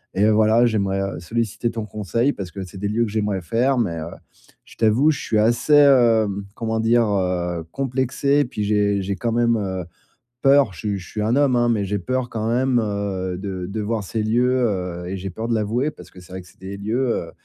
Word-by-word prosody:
Et 100 - +3
heu, 110 - +4
voilà, 110 +2 +4
j'aimerais 100 -4 0 0.2
solliciter 115 +4 -2
ton 115 -2 -4
conseil 110 +6 -1
parce 95 -3 -6
que 95 - -6
c'est 95 +1 -11
des 100 - -2
lieux 115 +2 +1
que 105 - -6
j'aimerais 105 -3 -1
faire, 120 +9 +1
mais, 85 -8 -1
heu, 80 +2 -5 0.6
je - - -16
t'avoue, 115 +7 +3
je 145 - -4
suis 110 - -1
assez, 120 +7 +2
heu, 120 -7 +5 0.3
comment 110 -1 -2
dire, 115 +1 +3
heu, 90 -4 -1
complexé. 135 +2 0
Puis 105 -4 -4
j'ai 100 -1 +1
j'ai 100 +1 -2
quand 115 -1 -2
même, 120 0 +2
heu, 95 -3 -3 0.6
peur. 135 -7 +4
Je - - -13
suis 105 -2 -2
je 90 - -12
suis 105 - -4
un 115 +3 +1
homme, 140 -3 +3
hein, 120 0 +2
mais 110 -3 +1
j'ai 100 +1 -2
peur 130 +6 -2
quand 110 -1 -3
même, 125 +1 +2
heu, 100 -3 -3
de 95 -2 -5
de 105 +2 -4
voir 110 +1 -2
ces 110 +3 -3
lieux, 120 +3 +2 0.2
heu. 90 -3 -4
Et 95 - -3
j'ai 95 +1 -5
peur 110 +5 -5
de 115 - +1
l'avouer 115 +7 0
parce 150 - -14
que 90 - -14
c'est 90 - -16
vrai 95 - -5
que 90 - -17
c'est - - -21
des 95 +1 -7
lieux, 115 +6 -1 0.2
heu, - - -11
110 Hz, 230 wpm, -22 LUFS, 95-120 Hz, 0.6 s, heu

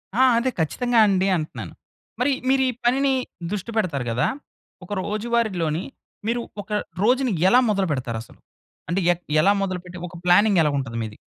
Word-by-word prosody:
ఆ! 260 - +5
అదే, 255 +2 +1
ఖచ్చితంగా 240 - +1
అండి 190 -1 +2
అంటన్నాను. 155 -1 -6 0.5
మరి 265 +3 +2 0.2
మీరు 265 0 +4
ఈ - - 0
పనిని 270 +2 +3 0.4
దుష్టి 210 +2 -4
పెడతారు 155 - 0
గదా! 120 - +1 0.6
ఒక 180 - -13
రోజువారీలోని, 210 -7 -1 0.4
మీరు 235 +1 0 0.2
ఒక 210 - -15 0.3
రోజుని 250 -1 +2 0.2
ఎలా 250 - +6
మొదలుబెడతారసలు? 135 - -2 0.5
అంటే 180 +3 +1
ఎక్ 175 - -14 0.2
ఎలా 200 - +5
మొదలుపెట్టి, 180 -2 -4
ఒక 175 - -12
ప్లానింగెలా 180 -3 +5
గుంటది 120 -4 -3
మీది? 105 -1 -7
195 Hz, 145 wpm, -23 LUFS, 160-235 Hz, 0.6 s, ఎలా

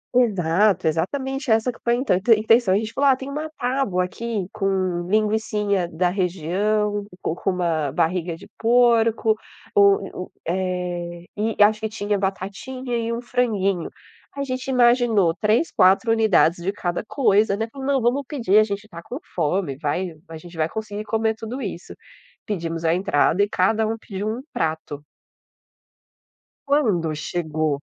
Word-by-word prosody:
exato, 195 -5 +3
exatamente 265 - -1
essa 220 +2 +3
que 245 - -6
foi 235 0 +2
a - - -2
inta 255 -6 +1 0.2
intenção, 220 -2 +3
a - - +4
gente 220 +1 -4
falou: 280 0 +3
"Ah, 265 - +5
tem 265 +1 -7
uma 305 +3 -4
tábua 245 -8 0
aqui 215 0 -4
com 190 -4 -1
linguicinha 210 -3 +1
da 180 +3 0
região, 200 +4 0 0.2
com 160 - -2
com 195 - -2
uma 165 -5 -1
barriga 170 +2 -1
de 200 - -14
porco, 230 -2 +3 0.4
u 200 -2 +3
u - - -34 0.2
eh, 175 -1 -3
e 215 +1 -2
acho 215 +1 +5
que 220 - -2
tinha 205 -1 -1
batatinha 205 +7 -4
e 230 0 -2
um 235 +1 -3
franguinho. 200 -8 0 0.4
A 280 - -3
gente 255 0 -4
imaginou 240 -8 +3
3, 220 +10 +2
4 195 +5 +4
unidades 190 -6 +3
de 190 - 0
cada 175 -3 -3
coisa, 210 -5 +2
né, 225 +1 -2
falou: 265 +3 -8
"Não 275 -1 +2
vamos 245 +4 +1
pedir, 230 -9 +2
a - - +6
gente 205 0 -5
tá 170 -4 -10
com 250 - -6 0.2
fome, 165 -3 0
vai 160 +4 -2
a 160 - -7
gente 175 +2 -13
vai 160 0 0
conseguir 215 0 -5
comer 220 +1 0
tudo 225 +5 -6
isso". 190 -6 -6 0.5
Pedimos 165 -4 -3
a 160 - +3
entrada 185 0 +2
e 205 - -1
cada 215 +4 +2
um 225 +1 -2
pediu 205 -1 -5
um 230 +3 -4
prato. 155 -2 -3 1.6
Quando 210 - +1
chegou 155 -2 -2
205 Hz, 160 wpm, -22 LUFS, 175-230 Hz, 1.6 s, a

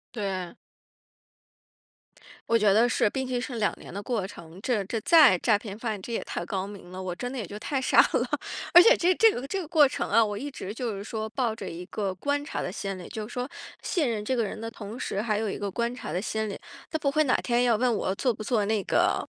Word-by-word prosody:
对。 190 -4 -3 2.0
我 230 - +5
觉 210 -2 +4
得 225 +4 +5
是， 220 - +2
并 265 +3 -2
且 250 -1 -1
是 245 0 -4
2 215 - +2
年 - - -11
的 200 +2 -5
过 215 -4 -1
程， 170 -3 -12
这 230 -5 +1
这 225 +4 -3
再 315 - +7
诈 210 +4 +2
骗 205 -1 -8
犯 220 -3 -3
这 190 - -9
也 230 - -1
太 - - -4
高 190 0 -2
明 200 -3 -11
了， 185 +1 -7
我 185 -2 -3
真 245 +7 -5
的 265 - -6
也 220 - -3
就 205 +4 -7
太 270 +5 -2
傻 260 - +1 0.2
了。 - - +2 0.5
而 350 - +11
且 465 +6 +7
这 360 +1 +3
这 450 - +6
个 265 - -4
这 390 +7 -2
个 335 - -7
过 305 -2 +6
程 275 - -3
啊， 230 - +5
我 205 -1 -3
一 290 +5 -5
直 200 -7 -6
就 230 -2 -3
是 200 - -6
说 220 0 -4
抱 230 0 -1
着 225 - -7
一 170 +2 -7
个 195 -1 -3
观 285 +10 -1
察 290 - -4
的 180 - -4
心 195 -1 -4
理， 180 - -9
就 215 -1 -5
是 - - -10
说 250 0 -2 0.4
信 320 -8 0
任 215 -2 -2
这 260 - 0
个 240 - +1
人 215 - -5
的 225 +1 -5
同 220 +1 -8
时， 195 - -2
还 215 -1 0
有 215 0 -1
一 - - -4
个 200 -1 -3
观 235 +4 -1
察 250 - -7
的 180 +4 -2
心 220 0 -2
理。 200 - -5 0.3
他 315 - -1
不 285 -2 +1
会 310 +1 +4
哪 260 - +3
天 240 0 +1
要 235 -2 +4
问 245 +1 +2
我 190 -2 -1
做 250 +5 +1
不 215 - -8
做 215 -1 +1
那 210 0 0
个， - - +1
220 Hz, 280 characters per minute, -27 LUFS, 200-250 Hz, 2.0 s, 而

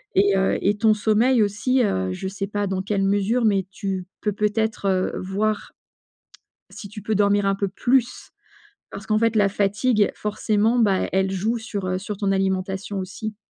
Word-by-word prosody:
et 195 0 +4
heu, 190 - +1
et 205 +1 +1
ton 220 0 +4
sommeil 220 +3 +2
aussi, 245 +5 +1
heu, 95 - 0
je 190 - -5
sais 195 +1 -4
pas 205 0 -2
dans 190 0 -2
quelle 200 -1 -1
mesure, 205 +5 +1
mais 195 -3 +2
tu 190 -2 -4 0.2
peux 210 -2 -1
peut-être, 210 0 -1
heu, 185 -1 +1
voir 205 +3 -2 1.0
si 200 - -9
tu 210 -1 -9
peux 215 +1 -1
dormir 205 0 +2
un 195 0 +1
peu 200 - -1
plus? 245 +5 0 0.6
Parce 200 +2 -8
qu'en 215 0 +2
fait, 230 -1 +1
la 205 -2 +4
fatigue, 205 +2 +1
forcément, 215 +2 0
bah, 200 -4 +2
elle 190 0 +1
joue 215 +5 -1
sur, 210 -3 -5
heu, 185 0 -1
sur 205 +1 -5
ton 200 -2 0
alimentation 190 +1 -1
aussi. 210 +3 -6
205 Hz, 180 wpm, -23 LUFS, 195-215 Hz, 1.0 s, et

